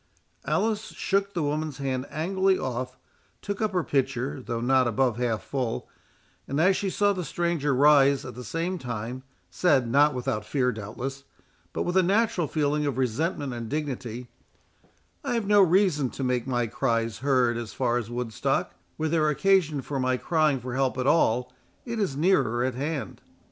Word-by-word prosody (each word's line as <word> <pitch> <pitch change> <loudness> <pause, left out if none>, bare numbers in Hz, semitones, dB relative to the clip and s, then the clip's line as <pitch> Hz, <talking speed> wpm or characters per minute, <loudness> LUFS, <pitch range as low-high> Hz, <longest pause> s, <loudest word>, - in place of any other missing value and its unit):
Alice 220 -1 0
shook 200 0 -1
the 170 - 0
woman's 150 -1 -2
hand 130 -1 -2
angrily 190 +4 +1
off, 130 0 -4 0.4
took 200 0 -5
up 215 -1 +1
her 180 -3 0
pitcher, 135 0 -1
though 115 -1 -3
not 130 +1 +3
above 120 0 +1
half 120 -3 -1
full, 125 -5 -3 0.6
and 140 - -2
as 185 +4 +4
she 195 - -1
saw 205 +2 +2
the 185 -2 -3
stranger 170 -4 -1
rise 140 0 +5
at 125 - -7
the 125 - -8
same 170 - -3
time, 120 0 -5 0.3
said, 140 -9 +2
not 145 +4 +4
without 125 -4 -2
fear 125 +3 0
doubtless, 125 +5 -6 0.5
but - - -2
with 175 - -2
a 190 - +6
natural 190 -2 +1
feeling 150 0 0
of 135 -3 -2
resentment 135 +2 -1
and 115 -2 -6
dignity, 125 -5 -4 1.0
"I - - -1
have 230 -3 -1
no 205 0 +5
reason 180 -7 +3
to 135 - -3
make 125 -1 0
my 120 -2 0
cries 115 -1 -1
heard 130 -3 +2
as 115 -3 -5
far 120 -2 0
as 115 -2 -6
Woodstock; 120 -2 -1 0.2
were 160 - -1
there 155 -1 +2
occasion 155 -4 +2
for 140 0 -3
my 130 0 +1
crying 155 -2 +1
for 125 0 -6
help 130 0 0
at 130 - -1
all, 125 -4 +2 0.3
it 235 -2 -4
is 180 -10 -1
nearer 135 -9 +2
at 130 0 0
hand." 140 +3 -4
135 Hz, 175 wpm, -26 LUFS, 125-165 Hz, 1.0 s, a